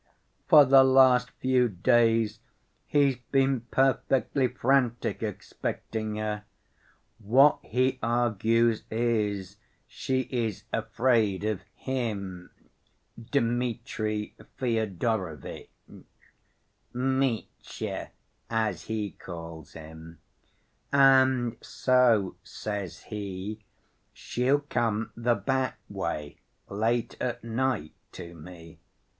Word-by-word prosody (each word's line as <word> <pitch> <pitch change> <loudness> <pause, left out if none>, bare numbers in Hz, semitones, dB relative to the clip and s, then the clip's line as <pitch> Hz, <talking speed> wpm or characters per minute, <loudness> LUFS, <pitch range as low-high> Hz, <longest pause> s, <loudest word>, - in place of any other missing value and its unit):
For 150 -2 +8
the 135 0 +7
last 130 -2 +5
few 130 -2 +1
days 115 +1 +2 0.5
he's 140 -3 +3
been 135 0 +1
perfectly 135 0 +2
frantic 125 -1 0
expecting 110 -1 -4
her. 105 -1 -3 0.7
What 135 +8 +5
he 130 +2 0
argues 115 -1 +2
is, 105 -4 -1 0.3
she 130 -1 -2
is 115 -6 -2
afraid 115 -3 +1
of 105 -3 -1
him, 100 -9 -4 0.8
Dmitri 115 -4 -1 0.2
Fyodorovitch 110 - -2 1.2
(Mitya, 130 -1 -2 0.4
as 110 -4 -1
he 110 -3 -3
calls 85 -3 -9
him), 80 +1 -11 0.7
'and 130 -3 +4
so,' 125 -7 +2
says 100 -5 -5
he, 105 0 -6 0.5
'she'll 130 +4 0
come 115 -6 -1
the 120 +1 +1
back‐way, 100 - -3 0.3
late 115 +3 -1
at 125 -3 -3
night, 115 - -1 0.2
to 85 -2 -9
me. 85 0 -12
115 Hz, 80 wpm, -27 LUFS, 100-130 Hz, 1.2 s, For